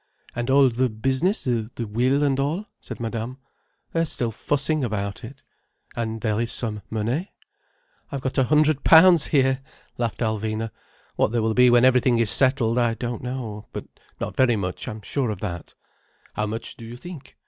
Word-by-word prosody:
"And 120 +1 -3
all 135 0 +5
the 125 +2 0
business, 130 - 0
the 115 -3 -1 0.2
will 125 +7 +1
and 135 -2 +1
all?" 155 +9 -1
said - - -9
Madame. 115 +2 -4 0.6
"They're 165 0 +1
still 120 -5 -1
fussing 145 +6 -1
about 100 -4 -3
it." - - -11 0.5
"And 115 -1 -4
there 110 -1 0
is 115 - -1
some 110 -3 0
money?" 115 - -2 0.8
"I - - -4
have 135 - -4
got 130 0 -2
a 130 - +3
hundred 150 0 +2
pounds 165 -1 +7
here," 135 -2 +2 0.4
laughed 120 -1 -2
Alvina. 110 0 -2 0.5
"What - - +2
there 115 -1 0
will 110 0 +1
be 125 +2 +5
when 120 +1 +5
everything 125 -1 +3
is 115 -3 +7
settled, 125 -3 +4
I 120 -1 +1
don't 120 -1 -5
know. 120 -5 -6
But - - -6 0.3
not - - -5
very 125 -3 +3
much, 90 -3 -4
I'm 110 -3 -7
sure 130 +2 -2
of 105 -4 -4
that." 85 -6 -6 0.6
"How 105 - -2
much 110 +2 -6
do - - -11
you 115 +2 -9
think? 175 0 -11
120 Hz, 180 wpm, -23 LUFS, 110-135 Hz, 0.8 s, pounds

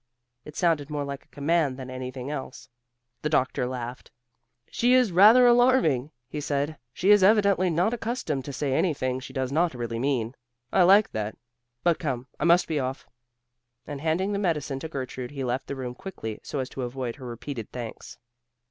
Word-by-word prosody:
It 150 - -10
sounded 160 -5 +1
more 145 -1 -2
like 140 -1 -6
a - - -36
command 145 -2 0
than 130 -1 -7
anything 130 +1 -5
else. 130 -4 -6 0.5
The 150 - -1
doctor 130 -4 +1
laughed. 125 -1 -6 0.6
"She 245 +2 +3
is 250 -6 +4
rather 215 +8 +7
alarming," 240 - +4 0.2
he 150 +4 -5
said, 145 +1 -2
"she 190 - +2
is 205 -1 +7
evidently 200 -2 +4
not 175 +7 +1
accustomed 225 - -2
to 140 - -5
say 135 0 -2
anything 130 -5 0
she 130 - -9
does 130 -1 -2
not 165 0 +1
really 120 -1 -3
mean. 125 -3 0 0.4
I - - +5
like 195 +4 +6
that. 110 0 -4 0.5
But 170 -2 +2
come, 130 -5 -3
I - - 0
must 170 +1 +5
be 155 -3 0
off," 130 0 -4 0.8
and 145 -2 -6
handing 175 +6 0
the 200 - -1
medicine 150 -8 -1
to 160 - -6
Gertrude 130 -3 -5
he 140 -2 -5
left 125 +1 -2
the 140 - -4
room 125 -2 -5
quickly 120 - -7
so - - -6
as 130 -2 -2
to 135 - -6
avoid 125 0 -4
her 130 - -10
repeated 120 -1 -6
thanks. 120 -3 -7
145 Hz, 185 wpm, -26 LUFS, 130-175 Hz, 0.8 s, rather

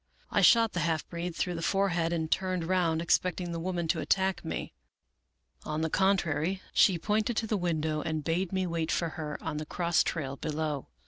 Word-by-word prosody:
I - - +3
shot 230 -2 +6
the 175 - -1
half 165 -2 0
breed 170 0 -4
through 180 - -1
the 165 - -4
forehead, 175 -3 +1
and 160 -2 -2
turned 185 -2 0
round, 165 -2 +1
expecting 180 +1 +1
the 165 - -3
woman 175 -1 -2
to 165 - +2
attack 190 +2 +1
me. 160 - -4 0.9
On 155 +1 -3
the 160 -1 -1
contrary, 185 -2 +1
she 185 -4 +5
pointed 215 +6 0
to 225 - +1
the 220 - 0
window, 160 -4 -1
and 160 -2 -2
bade 170 +3 -1
me 190 -1 0
wait 165 -2 -1
for 170 - 0
her 150 -1 -5
on 160 -2 -3
the 155 - -4
cross 170 -1 +1
trail 140 -4 -2
below. 150 -2 -3
170 Hz, 195 wpm, -29 LUFS, 160-185 Hz, 0.9 s, shot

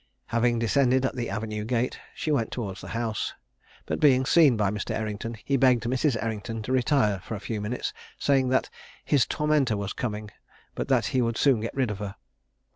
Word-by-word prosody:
Having 120 0 +3
descended 130 +3 +2
at 130 - -1
the 120 -2 -3
avenue 105 -1 -3
gate, 120 +2 -1 0.2
she 155 - -2
went 115 -7 +1
towards 105 -6 -4
the - - -9
house, 115 -3 -2 0.5
but - - -2
being 130 -3 +5
seen 145 -5 +5
by 100 -2 +1
Mr. 105 -2 -3
Errington, 110 +1 -4
he 140 - +2
begged 125 -3 +4
Mrs. 125 +2 +1
Errington 110 0 -4
to 120 - -4
retire 130 -6 +2
for 105 +4 -6
a - - -5
few 105 +1 -4
minutes, 110 +4 -3 0.2
saying 135 -2 +2
that 130 - +1 0.3
"his 140 -5 +3
tormentor 150 -7 +1
was 100 -1 -3
coming, 105 -3 -4 0.4
but - - -3
that - - +3
he 130 - +3
would 115 -1 0
soon 135 -5 +4
get 115 +2 -4
rid 130 -5 +1
of 105 - -6
her." 100 -2 -5
115 Hz, 200 wpm, -26 LUFS, 105-130 Hz, 0.5 s, being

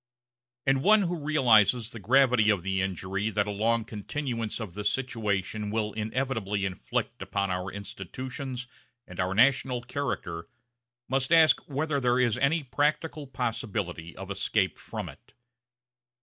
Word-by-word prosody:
And 135 0 +3
one 210 +5 +5
who 175 -1 -1
realizes 120 -6 +4
the 115 - -8
gravity 125 0 +4
of 100 -5 +2
the 95 0 0
injury 95 +2 -2
that 105 -1 +1
a 105 - -3
long 110 +2 +1
continuance 115 +1 -3
of 105 -6 -6
this 105 +1 0
situation 105 -5 -2
will 105 -1 -1
inevitably 110 -3 -1
inflict 95 -2 -3
upon 100 -1 -1
our 90 +1 -2
institutions 125 +6 -6 0.4
and 90 - -11
our 90 +1 0
national 125 +1 +3
character 90 -12 -4 0.6
must 130 +2 0
ask 165 -2 +6
whether 145 +1 0
there 125 -1 +2
is 120 -3 +3
any 145 +4 +2
practical 150 +2 -1
possibility 105 -10 -3
of - - -7
escape - - 0
from - - -6
it. - - -14
115 Hz, 140 wpm, -28 LUFS, 100-135 Hz, 0.6 s, ask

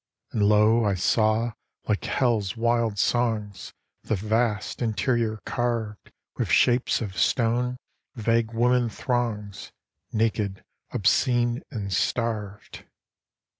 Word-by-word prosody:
And, 110 - -1
lo! 105 +2 +4
I 100 -2 +1
saw, 110 +5 +2 0.4
like 105 -2 0
Hell's 115 -7 0
wild 115 -2 +1
songs, 110 -3 -1 0.3
The 110 - -1
vast 110 +3 -1
interior 110 0 0
carved 115 -4 -3 0.3
With - - -1
shapes 125 0 +3
of 100 -4 -5
stone, 125 +3 +1 0.4
vague 115 0 +1
woman 120 +1 +2
throngs, 110 -4 -3 0.4
Naked, 105 -3 -1 0.3
obscene, 120 +4 +2
and 100 -8 -4
starved. 105 0 -2
115 Hz, 100 wpm, -25 LUFS, 105-120 Hz, 0.4 s, lo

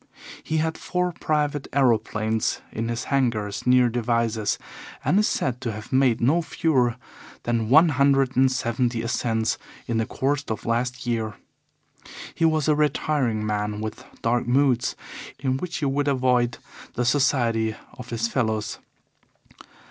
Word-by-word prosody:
He 160 - -1
had 160 +1 -1
four 180 0 -1
private 150 -3 -1
aeroplanes 110 -4 +1
in 115 +1 -3
his 115 0 -2
hangars 115 -7 -1
near 125 0 +5
Devizes, 115 -2 0 0.5
and 195 - +4
is 210 - +3
said 125 -1 -1
to 120 -3 -2
have 110 +3 -8
made 130 -3 +3
no 150 +9 +3
fewer 135 -6 +1 0.5
than 115 -2 -1
one 160 +6 +7
hundred 135 -1 +3
and 130 0 +4
seventy 120 -1 -1
ascents 115 -1 0 0.3
in 115 -2 -1
the 115 - -1
course 140 +2 -1
of 110 - -4
last 125 +2 -1
year. 110 -3 -2 1.0
He 165 - +1
was 155 -2 +2
a 155 - +5
retiring 145 -6 0
man 105 0 -2
with 110 0 -5 0.2
dark 120 +1 +1
moods, 125 -1 +2 0.4
in 130 -1 -1
which 175 +4 -4
he 150 - -2
would 140 +1 0
avoid 125 -3 +2 0.4
the 125 - 0
society 120 -5 +2 0.2
of 125 - -10
his 115 -1 -1
fellows. 110 -4 -1
125 Hz, 145 wpm, -24 LUFS, 115-140 Hz, 1.0 s, one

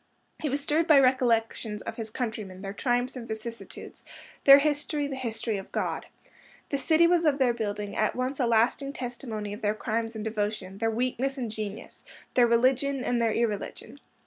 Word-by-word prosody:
He 305 - -1
was 280 +2 -1
stirred 310 +3 +1
by 300 -3 +7
recollections 230 -5 +1
of - - -6
his 225 -2 -4
countrymen, 215 -5 -5
their 195 0 -4
triumphs 245 +3 0
and 240 -2 -7
vicissitudes, 225 +1 -7 0.4
their 275 0 +11
history 295 0 0
the 280 -1 -4
history 230 -4 -2
of 195 - -8
God. - - -2 0.6
The 280 - -1
city 320 +4 +4
was 345 0 +3
of 300 -3 +3
their 255 -3 +3
building, 210 -3 -3
at 215 - +1
once 255 +2 -2
a 250 - +2
lasting 235 +5 +2
testimony 235 -5 -5
of 210 - -8
their 210 0 +1
crimes 225 +1 -2
and 215 - -4
devotion, 210 -3 -3
their 225 - +1
weakness 255 +4 -1
and 240 -4 -3
genius, 215 -1 -7 0.3
their 245 -1 +5
religion 260 +3 +2
and 240 -1 0
their 230 -1 +2
irreligion. 220 -3 -3
235 Hz, 180 wpm, -28 LUFS, 220-270 Hz, 0.6 s, their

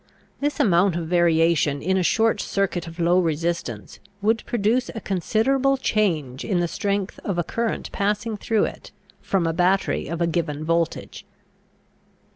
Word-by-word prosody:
This 290 +1 -1
amount 180 -1 +3
of 170 -1 -2
variation 165 -4 +3
in 190 +6 0
a 190 - +2
short 220 +3 +2
circuit 190 -4 -1
of 165 0 -10
low 175 +2 +3
resistance 165 - -2 0.2
would 220 +3 +1
produce 240 +3 +1
a - - -3
considerable 240 +9 +1
change 165 - 0
in 185 -4 0
the 175 - +1
strength 200 +2 -2
of 195 -4 -2
a 175 - +1
current 230 +6 -3
passing 210 +2 -1
through 215 +1 +1
it - - -8 0.3
from 190 -3 0
a 165 - 0
battery 185 +3 +1
of 170 0 -4
a 170 - +2
given 155 -3 -2
voltage. 165 0 -1
180 Hz, 155 wpm, -23 LUFS, 165-210 Hz, 0.3 s, amount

